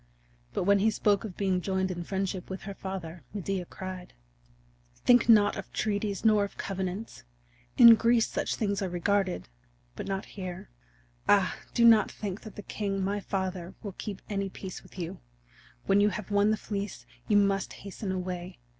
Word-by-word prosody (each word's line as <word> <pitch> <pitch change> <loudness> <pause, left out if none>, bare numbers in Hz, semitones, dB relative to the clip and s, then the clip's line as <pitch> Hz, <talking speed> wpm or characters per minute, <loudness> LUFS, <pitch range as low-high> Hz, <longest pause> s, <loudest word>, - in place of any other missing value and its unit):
But - - 0
when 200 +2 +4
he 215 +3 +4
spoke 205 -1 +2
of 205 -5 -7
being 190 -2 +1
joined 190 0 0
in 175 -1 -4
friendship 190 0 -3
with 190 0 -6
her 200 - -5
father, 180 -5 -6
Medea 195 -2 -2
cried: 185 0 -8 0.8
"Think 245 -1 +4
not 210 -2 +6
of 195 - -7
treaties 205 -1 -1
nor 215 -2 +5
of 200 - -6
covenants. 190 +3 -4 0.5
In 235 -1 +11
Greece 230 0 +3
such - - -2 0.2
are 190 - -1
regarded, 190 +2 0 0.5
but - - -6
not 195 0 -2
here. 185 - -7 0.6
Ah, 195 -3 +4 0.2
do 235 - +5
not 225 -2 +7
think 200 -1 -5
that 215 - -10
the 205 - -8
king, 195 -2 -2
my 200 +2 0
father, 190 -2 -3
will 205 - -4
keep 200 -3 -6
any 195 -1 -2
peace 185 -1 -8
with - - -17
you! 170 -2 -5 0.7
When 200 - +4
you 205 - +5
have 210 -1 -6
won 205 +1 +4
the 215 - +2
Fleece 200 -1 -5 0.2
you 210 - +4
must 195 -1 +2
hasten 200 0 -6
away. 180 -1 -4
195 Hz, 170 wpm, -29 LUFS, 185-205 Hz, 0.8 s, In